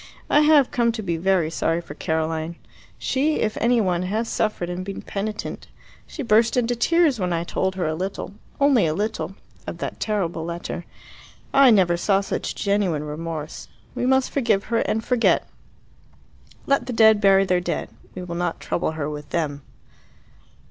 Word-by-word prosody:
I 295 - +6
have 300 -3 +5
come 235 -1 +2
to 220 -2 -5
be 170 -3 -1
very 175 -1 +1
sorry 165 0 0
for 170 -4 -9
Caroline. 160 +1 -2 0.4
She, 295 +4 0
if 215 - -1
any 240 +1 +3
one, 180 -4 +1
has 215 +5 -1
suffered 215 -6 -1
and 180 +1 -4
been 195 +1 -6
penitent. 210 +1 -5 0.4
She 300 - -6
burst 230 +1 +3
into 245 0 +1
tears 305 +1 +3
when 180 -2 -1
I 170 0 0
told 190 +2 -1
her 185 - -1
a 155 - 0
little, 185 +2 -4 0.3
only 275 - +4
a 155 - -1
little, 205 -1 -3 0.3
of - - -5
that - - -5
terrible 185 -7 -1
letter. 170 +1 -5 0.7
I 275 -1 +7
never 185 -6 +4
saw 195 +2 +2
such 200 - -3
genuine 200 -7 0
remorse. 155 +1 -6 0.3
We 250 0 -1
must 265 0 +2
forgive 225 -7 +1
her 230 - +3
and 220 +1 -1
forget. 245 -2 +2 1.2
Let 275 -1 +1
the 250 - -3
dead 220 -2 +5
bury 195 -1 +5
their 180 -1 +1
dead. - - -3 0.2
We 185 - -5
will 175 -1 -6
not 175 -1 -2
trouble 165 - -2
her 150 -2 -3
with 150 -1 -7
them." 150 -4 -2
195 Hz, 175 wpm, -23 LUFS, 170-230 Hz, 1.2 s, I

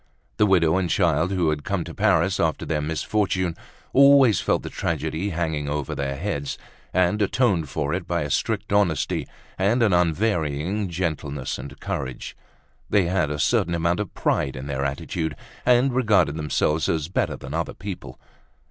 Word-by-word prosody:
The 105 - +4
widow 85 -3 +4
and 90 -2 0
child, 85 -2 +2
who 90 -5 +1
had 75 -1 -3
come - - -1
to - - -8
Paris - - +2
after - - 0
their 75 -2 -1
misfortune, 90 +3 -1 0.4
always 135 -6 +6
felt - - 0
the - - -5
tragedy 95 +6 -2
hanging 80 -4 -2
over 75 -2 -2
their 70 -1 -2
heads, 70 +1 -3 0.3
and 90 +4 +2
atoned 100 - +1
for 75 +3 -2
it 90 -1 -3
by 85 -3 0
a 75 - -4
strict 105 +5 -1
honesty 85 -9 +1 0.3
and 110 +6 +3
an 105 -4 +3
unvarying 90 +1 0
gentleness 75 -6 -3
and 70 -1 -9
courage. 65 -2 -5 0.5
They 100 -3 +3
had 90 -3 +1
a 75 - -3
certain 85 +3 +1
amount 85 +3 +1
of 105 -4 -3
pride 65 - 0
in 65 +1 -6
their 70 -1 -2
attitude 75 +3 -3 0.3
and 125 +1 +4
regarded 110 - +3
themselves 75 +1 0
as 80 -2 0
better 90 - -1
than 65 +2 -9
other 80 +1 -2
people. 90 -7 -7
85 Hz, 165 wpm, -24 LUFS, 75-100 Hz, 0.5 s, always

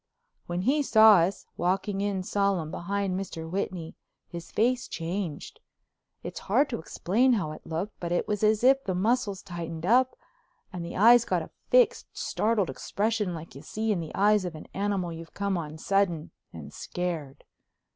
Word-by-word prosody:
When 175 +1 -2
he 285 +7 +3
saw 220 -6 +7
us, 175 +3 0
walking 195 +3 0
in 200 -2 -1
solemn 195 -5 0
behind 195 +2 -2
Mr. 165 -4 -5
Whitney, 180 -2 -3 0.3
his 170 -1 -8
face 245 +3 +1
changed. 170 -2 -5 0.6
It's - - -6
hard 270 +8 +3
to 235 - -2
explain 225 +10 +1
how 180 -9 -1
it - - -11
looked, 170 +6 -4
but 170 -1 -4
it 175 - 0
was 210 -1 -2
as 215 +1 +3
if 270 +1 +5
the 185 - -2
muscles 205 0 0
tightened 170 -2 -6
up 250 +5 +4 0.6
and 175 -2 -4
the 170 - -6
eyes 235 +4 +7
got - - 0
a - - -12 0.2
fixed - - +4
startled 215 -4 0
expression 210 -3 -1
like 165 -3 -9
you 135 - -10
see 220 +7 -2
in 195 - 0
the 160 -2 -6
eyes 210 0 +4
of 175 -3 -5
an 155 - -9
animal 195 -3 -1
you've 165 0 -10
come 200 -1 -1
on 155 -3 -5
sudden 175 -3 0 0.2
and - - -10
scared. 165 -7 -4
195 Hz, 175 wpm, -27 LUFS, 170-215 Hz, 0.6 s, saw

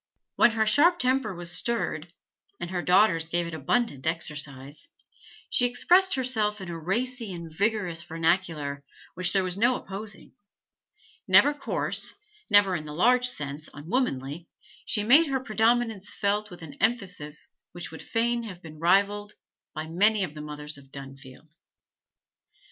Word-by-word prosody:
When - - +6
her 220 -1 +1
sharp 335 +10 +5
temper 260 - +1
was 175 0 -4
stirred 175 -9 -1 0.5
and 175 +1 -5
her 180 -1 -1
daughters 180 -3 +3
gave 175 +1 0
it 170 - -6
abundant 160 - -1
exercise 150 - -5 0.6
she 245 - +3
expressed 360 +10 +3
herself 220 -5 0
in 190 -2 -7
a 165 -1 -5
racy 230 +6 -2
and 170 -2 -7
vigorous 200 -4 0
vernacular 165 -4 -1 0.3
which 180 0 0
there 195 -1 +2
was 185 0 -2
no 240 +3 +4
opposing; 205 0 -7 0.9
never 290 - +6
coarse, 290 - -3 0.3
never, 205 -3 +6
in 155 -2 -4
the 150 0 -7
large 250 +7 +4
sense, 150 - -5
unwomanly, 155 - -2 0.4
she 210 - +1
made 285 +9 +6
her 270 -1 0
predominance 225 -3 0
felt 210 +1 -1
with 175 -2 -11
an 150 -3 -9
emphasis 185 -10 -2 0.2
which 175 -2 -7
would 160 - -9
fain 235 +1 0
have 190 -6 -9
been 155 -2 -11
rivalled 200 +4 +2 0.4
by 155 0 -4
many 200 +5 +2
of 155 - -4
the 150 - -8
mothers 150 -1 -7
of 140 - -17
Dunfield. 135 +2 -11
185 Hz, 150 wpm, -27 LUFS, 160-225 Hz, 0.9 s, When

